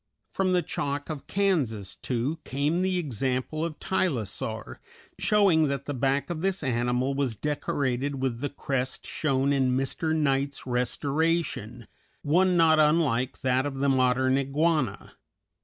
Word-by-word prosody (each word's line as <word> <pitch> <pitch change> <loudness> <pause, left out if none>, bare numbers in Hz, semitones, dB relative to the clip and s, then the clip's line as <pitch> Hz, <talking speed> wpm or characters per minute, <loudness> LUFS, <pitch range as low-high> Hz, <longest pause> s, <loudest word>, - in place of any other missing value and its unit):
From 185 -1 +1
the 180 -1 +2
Chalk 145 0 -3
of 150 -3 -7
Kansas, 140 - 0
too, 130 +6 -2
came 145 +6 0
the 185 0 +1
example 135 - -2
of 165 -2 -4
Tylosaur, 115 - -2 0.4
showing 195 -7 +4
that 140 -1 -3
the 145 - -3
back 135 +3 0
of 160 -2 -4
this 195 -2 -1
animal 125 +1 0
was 135 -4 -1
decorated 140 0 -2
with 130 -3 -1
the 145 +2 -2
crest 130 -2 -3
shown 140 -2 0
in 130 -2 +2
Mr. 155 +4 -1
Knight's 140 -2 0
restoration, 130 -1 -1 0.4
one 180 +4 +3
not 160 -1 +5
unlike 150 -5 +2
that 130 +1 +1
of 140 - -5
the 140 +1 +1
modern 130 0 +3
iguana. 140 - 0
140 Hz, 140 wpm, -27 LUFS, 130-160 Hz, 0.4 s, not